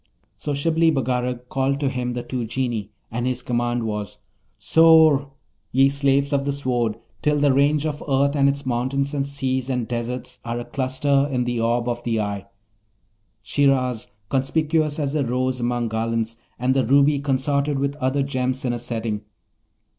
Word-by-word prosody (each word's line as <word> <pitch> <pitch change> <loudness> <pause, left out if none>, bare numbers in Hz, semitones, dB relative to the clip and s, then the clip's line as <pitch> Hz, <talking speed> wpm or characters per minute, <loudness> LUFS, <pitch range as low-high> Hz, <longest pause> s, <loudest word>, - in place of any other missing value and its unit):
So 145 - -4
Shibli 165 +3 +2
Bagarag 125 -2 -1
called 135 +2 0
to 145 - 0
him 125 -2 -2
the 120 0 -4
two 125 -2 -3
Genii, 115 -3 -2 0.2
and 120 +2 -2
his 125 -1 -2
command 120 -1 -1
was, 105 -2 -4 0.4
'Soar, 160 -4 +5 0.4
ye 135 +2 +5
slaves 140 0 +1
of 140 -1 +2
the 140 - -1
Sword, 125 -5 -1 0.2
till 150 0 +2
the 145 -2 +3
range 145 +2 +3
of 150 -1 -3
earth 140 +1 +2
and 140 -1 +4
its 140 0 -3
mountains 130 +3 -1
and 140 -1 -1
seas 130 -2 -2
and 125 -3 -1
deserts 120 +1 -4
are 115 0 -3
a 120 - -6
cluster 140 +1 +1
in 125 -2 0
the 120 -1 -2
orb 120 +1 +1
of 120 0 -2
the 115 -2 0
eye, 100 -1 -3 1.0
Shiraz 130 -2 +1 0.2
conspicuous 150 +3 +1
as 145 -2 -1
a 150 -2 +1
rose 130 +1 -1
among 120 -1 -1
garlands, 115 0 -1 0.2
and 125 +2 +1
the 135 -1 +2
ruby 140 +4 +4
consorted 140 +1 0
with 140 +1 -1
other 140 0 0
gems 130 -1 -2
in 120 - 0
a 120 - -3
setting. 115 -3 -3
130 Hz, 170 wpm, -23 LUFS, 120-140 Hz, 1.0 s, Soar